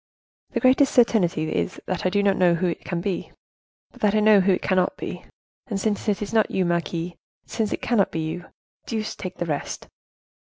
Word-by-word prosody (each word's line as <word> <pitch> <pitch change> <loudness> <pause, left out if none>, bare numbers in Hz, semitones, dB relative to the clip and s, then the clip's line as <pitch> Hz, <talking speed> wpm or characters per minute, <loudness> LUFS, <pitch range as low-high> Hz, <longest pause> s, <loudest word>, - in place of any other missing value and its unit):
The - - +1
greatest 265 +2 +4
certainty 180 - +3
is, 85 -1 -2
that 185 0 -1
I - - +3
do 200 +2 +1
not 200 -1 +3
know 175 -2 +4
who 175 +2 -1
it 175 - -2
can 175 -2 -3
be, 190 -1 -3 0.6
but - - -18
that 210 0 +3
I - - +4
know 210 -1 +6
who 195 +1 +3
it - - -2
cannot 185 -1 +1
be. - - -6 0.4
And 205 -6 -2
since 210 +1 -1
it 210 0 0
is 205 - -7
not 220 -1 +3
you, 185 - 0
marquise, 170 0 -1 0.3
since 220 -2 -2
it - - -3
cannot 220 -5 +2
be 160 - -2
you, 160 +3 -4 0.4
deuce 220 -2 -3
take 185 -1 -6
the 175 - -2
rest!" 150 -3 -4
190 Hz, 210 wpm, -24 LUFS, 175-215 Hz, 0.6 s, know